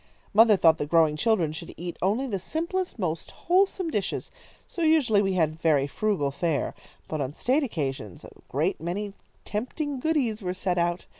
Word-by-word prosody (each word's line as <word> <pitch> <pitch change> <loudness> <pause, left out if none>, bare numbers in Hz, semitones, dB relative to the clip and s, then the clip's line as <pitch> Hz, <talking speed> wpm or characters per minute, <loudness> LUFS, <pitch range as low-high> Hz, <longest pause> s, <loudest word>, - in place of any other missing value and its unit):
Mother 215 0 +7
thought 165 -3 +5
that 145 - -3
growing 160 -2 +4
children 180 -4 +2
should 155 - -8
eat 175 +1 -5
only 210 +8 +1
the 205 -7 -2
simplest, 340 - -2
most 165 -6 -3
wholesome 370 -1 +1
dishes, 200 -7 -2 0.4
so 345 - -6
usually 295 -10 +4
we 195 -1 0
had 160 -2 0
very 150 -4 +3
frugal 145 -2 0
fare. 155 -3 -1 0.3
But 155 -2 -3
on 140 +2 -3
state 265 +5 +2
occasions 135 - -4
a - - -11 0.2
great - - 0
many 195 +5 -3 0.3
tempting 265 +6 -3
goodies 250 -7 0
were 180 -1 -3
set 180 -1 -1
out. 175 +1 0
195 Hz, 170 wpm, -26 LUFS, 160-250 Hz, 0.4 s, Mother